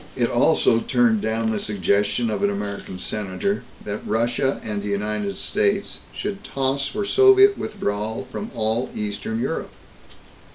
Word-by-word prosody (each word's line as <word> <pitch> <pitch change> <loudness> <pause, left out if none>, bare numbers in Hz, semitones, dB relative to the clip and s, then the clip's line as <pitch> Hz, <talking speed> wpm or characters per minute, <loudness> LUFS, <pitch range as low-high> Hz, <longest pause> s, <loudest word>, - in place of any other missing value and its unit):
It - - +1
also 115 - +4
turned 225 - +2
down 110 - 0
the 110 - -1
suggestion 105 +3 +1
of 105 - -2
an 100 - +3
American 100 -2 -5
senator 105 - -2 0.2
that 105 0 -3
Russia 120 +4 0
and 105 -2 -3
the 105 - -5
United 100 -1 -1
States 200 0 0
should 205 0 -5
toss 135 -2 -1
for 205 0 -3
Soviet 395 - +6
withdrawal 110 - -3
from 210 - -5
all 115 +2 0
Eastern 105 +2 -3
Europe. - - -2
110 Hz, 140 wpm, -23 LUFS, -, 0.2 s, Soviet